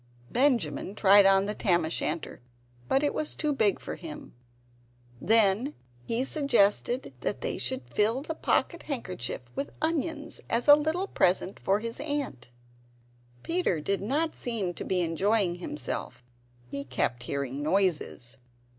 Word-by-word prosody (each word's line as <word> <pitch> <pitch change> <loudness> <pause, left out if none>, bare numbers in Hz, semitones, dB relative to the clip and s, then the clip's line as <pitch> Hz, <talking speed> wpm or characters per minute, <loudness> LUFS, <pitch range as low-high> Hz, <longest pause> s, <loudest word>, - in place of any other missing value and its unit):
Benjamin 245 -6 +1
tried 200 -1 +7
on 195 0 +5
the 210 - -2
tam 175 -6 +2
o' - - -3
shanter, 160 -3 -3 0.5
but 270 - +2
it 290 - +1
was 305 - -2
too 300 -2 0
big 215 -7 +2
for - - -6
him. 160 -4 -9 0.9
Then 225 +5 +3 0.3
he 230 +2 0
suggested 245 - +2
that 125 - -3
they - - -2
should 125 0 -2
fill 220 - +1
the 320 - -3
pocket 340 +1 0
handkerchief 185 - -3
with 280 - -3
onions, 315 -1 -2
as 235 +4 0
a 290 - +11
little 315 +5 0
present 185 - +1
for 200 +2 +1
his 230 +2 -4
Aunt. 285 - -3 0.9
Peter 335 - 0
did 195 +6 -1
not 295 +10 0
seem 215 -7 -2
to - - -6
be 185 -1 0
enjoying 185 +3 +2
himself; 130 -6 -5 0.4
he 140 +3 -5
kept 125 -2 -1
hearing 140 +1 -3
noises. 155 -8 0
205 Hz, 145 wpm, -28 LUFS, 165-275 Hz, 0.9 s, a